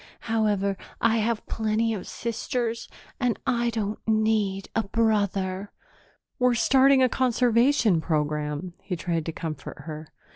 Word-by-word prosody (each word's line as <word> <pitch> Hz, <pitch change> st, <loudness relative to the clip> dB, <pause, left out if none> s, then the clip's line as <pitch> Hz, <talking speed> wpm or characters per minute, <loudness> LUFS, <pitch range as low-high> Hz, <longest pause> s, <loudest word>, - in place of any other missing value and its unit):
However, 210 Hz, -4 st, 0 dB, 0.2 s
I 230 Hz, 0 st, +3 dB
have 225 Hz, 0 st, 0 dB
plenty 220 Hz, +1 st, 0 dB
of 195 Hz, -4 st, -6 dB
sisters 235 Hz, 0 st, -3 dB, 0.3 s
and 245 Hz, -3 st, +1 dB
I 240 Hz, -2 st, +1 dB
don't 215 Hz, -2 st, -2 dB
need 215 Hz, -3 st, +1 dB
a 225 Hz, -, +3 dB
brother." 200 Hz, -3 st, 0 dB, 0.7 s
"We're 250 Hz, -1 st, +3 dB
starting 265 Hz, +2 st, +5 dB
a -, -, +6 dB
conservation 245 Hz, -, +3 dB
program," 150 Hz, +1 st, -2 dB
he 185 Hz, -, -4 dB
tried 165 Hz, -1 st, -2 dB
to -, -, -1 dB
comfort 160 Hz, -3 st, -6 dB
her. 155 Hz, 0 st, -8 dB
215 Hz, 125 wpm, -26 LUFS, 185-235 Hz, 0.7 s, a